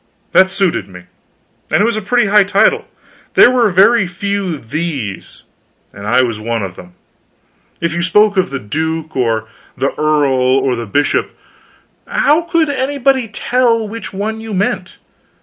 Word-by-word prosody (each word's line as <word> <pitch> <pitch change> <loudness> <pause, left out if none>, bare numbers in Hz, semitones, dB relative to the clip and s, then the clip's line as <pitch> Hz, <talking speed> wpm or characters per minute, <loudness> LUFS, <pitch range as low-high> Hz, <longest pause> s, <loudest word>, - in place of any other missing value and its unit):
That 190 0 +5
suited 185 - -1
me. 90 -1 -12 0.7
And - - +2
it 205 - +3
was 235 -1 0
a 215 - -2
pretty 240 +2 +1
high 210 +1 +5
title. 200 +1 +2 0.5
There 245 - +7
were 240 -4 +3
very 195 +3 +4
few 195 -1 -3
THE'S, 135 - -5 0.5
and 100 +1 -8
I 125 +4 +3
was 115 -4 -3
one 115 0 -2
of 95 -2 -6
them. 90 0 -13 0.9
If 170 -1 -1
you 175 - -2
spoke 205 +4 +3
of 185 -1 +1
the 135 - -4
duke, 160 +6 -4
or 115 -4 0 0.3
the 135 - -1
earl, 135 -4 +2
or 135 -2 0
the 115 -1 -6
bishop, 145 +9 0 0.7
how 300 +3 +2
could 335 -1 0
anybody 270 -2 0
tell 230 +1 0
which 225 +2 -7
one 215 +3 -4
you 220 -2 -5
meant? 190 -1 -2
185 Hz, 160 wpm, -15 LUFS, -, 0.9 s, There